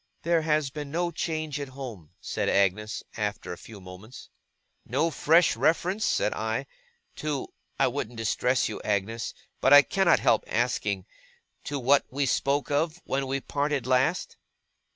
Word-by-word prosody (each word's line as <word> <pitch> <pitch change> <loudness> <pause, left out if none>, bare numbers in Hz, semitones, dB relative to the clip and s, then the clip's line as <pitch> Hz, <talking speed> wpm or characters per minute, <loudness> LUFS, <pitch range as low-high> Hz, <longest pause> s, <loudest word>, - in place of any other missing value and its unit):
'There 170 0 +2
has 155 -3 +1
been 145 -1 -6
no 170 +3 -1
change 155 -4 -3
at 140 - -4
home,' 110 - -8
said - - -2
Agnes, 100 +3 +1
after 105 -4 -3
a - - -6
few 105 +3 -12
moments. 95 +6 -12 0.5
'No 150 +7 0
fresh 165 +3 +4
reference,' 185 +6 +1
said - - +1
I, - - -2 0.5
'to 150 -3 -3 0.3
I - - +5
wouldn't 120 +1 -3
distress 125 +3 +1
you, 110 - -6
Agnes, 105 +2 -2 0.2
but 135 - +5
I 145 0 +10
cannot 190 0 +3
help 110 - +3
asking 105 -5 -1 0.6
to 145 - -3
what 140 +2 +4
we 140 +2 -1
spoke 140 +3 0
of, 160 +4 0
when 135 0 -1
we 135 +1 -2
parted 145 -2 -1
last? 130 +7 +1
135 Hz, 150 wpm, -27 LUFS, 110-155 Hz, 0.6 s, I